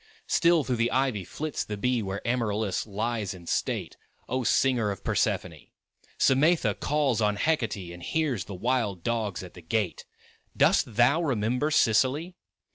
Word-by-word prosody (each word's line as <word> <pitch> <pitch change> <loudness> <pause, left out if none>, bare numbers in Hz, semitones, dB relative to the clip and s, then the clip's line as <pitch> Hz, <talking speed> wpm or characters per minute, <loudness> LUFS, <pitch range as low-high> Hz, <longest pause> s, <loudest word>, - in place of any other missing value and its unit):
Still 170 -2 +3
through 125 -2 -1
the 115 +1 +2
ivy 130 -7 0
flits 150 - -4
the 105 - -5
bee 125 +3 +1
Where 100 +1 -5
Amaryllis 110 -4 -1
lies 105 -1 -2
in 85 -2 -13
state; - - -2 0.3
O 130 +1 -1
Singer 120 -3 +2
of 100 - -5
Persephone! - - -1 0.5
Simætha 155 +6 +3
calls 140 -6 +1
on 105 -1 +2
Hecate 120 -1 0 0.2
And 85 - -11
hears 135 - -1
the 100 - -7
wild 110 -4 -1
dogs 110 -6 -2
at 90 - -11
the 90 - -12
gate; 90 +2 -2 0.5
Dost 115 - +3
thou 125 +8 +4
remember 125 -1 0
Sicily? 145 - +2
115 Hz, 150 wpm, -27 LUFS, 105-135 Hz, 0.5 s, thou